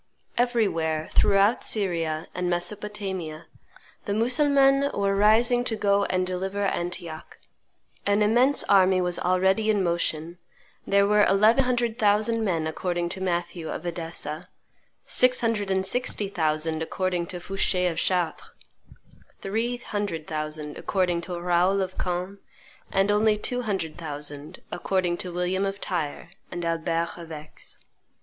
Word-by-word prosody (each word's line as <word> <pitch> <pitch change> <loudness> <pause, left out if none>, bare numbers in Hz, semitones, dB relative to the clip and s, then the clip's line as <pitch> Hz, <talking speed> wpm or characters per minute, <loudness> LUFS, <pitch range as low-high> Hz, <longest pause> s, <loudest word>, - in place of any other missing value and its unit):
Everywhere, 190 -11 0
throughout 200 +3 +3
Syria 165 -6 -1
and 180 0 -2
Mesopotamia, 185 -3 -2 0.6
the 200 - -1
Mussulmans 275 +3 +3
were 200 0 +1
rising 225 +4 +4
to 225 - 0
go 200 -1 +2
and 185 0 0
deliver 190 +2 -3
Antioch; 175 -4 -4 0.7
an 205 +1 +2
immense 245 +6 +4
army 190 -1 +4
was 180 -1 +1
already 190 +4 +2
in 205 -3 +2
motion; 170 -1 -1 0.5
there 200 0 +4
were 210 +1 +4
eleven 215 +7 +4
hundred 240 -2 0
thousand 215 +2 +2
men 170 -6 0
according 175 +2 -2
to 190 - -3
Matthew 175 -2 -2
of - - -5
Edessa, 165 -3 -4 0.6
six 250 0 +4
hundred 220 -4 0
and 190 0 +1
sixty 210 -2 -1
thousand 160 -3 0
according 180 +1 -2
to 180 -3 -4
Foucher 185 0 0
of 165 - -7
Chartres, 175 -3 -1 0.9
three 225 +5 -2
hundred 205 -9 -4
thousand 155 -1 -4
according 180 -3 0
to 175 0 -5
Raoul 180 +3 +2
of 185 -1 -3
Caen, 180 +2 -3 0.5
and 195 +1 +2
only 210 +1 +3
two 245 +4 -2
hundred 190 -8 -3
thousand 150 0 -6
according 180 -3 0
to 180 - -4
William 180 +2 -1
of 195 0 -2
Tyre 165 -2 -4 0.2
and 175 -1 -5
Albert 165 +1 -1
of 165 -1 -10
Aix. 155 0 -7
185 Hz, 135 wpm, -25 LUFS, 170-210 Hz, 0.9 s, rising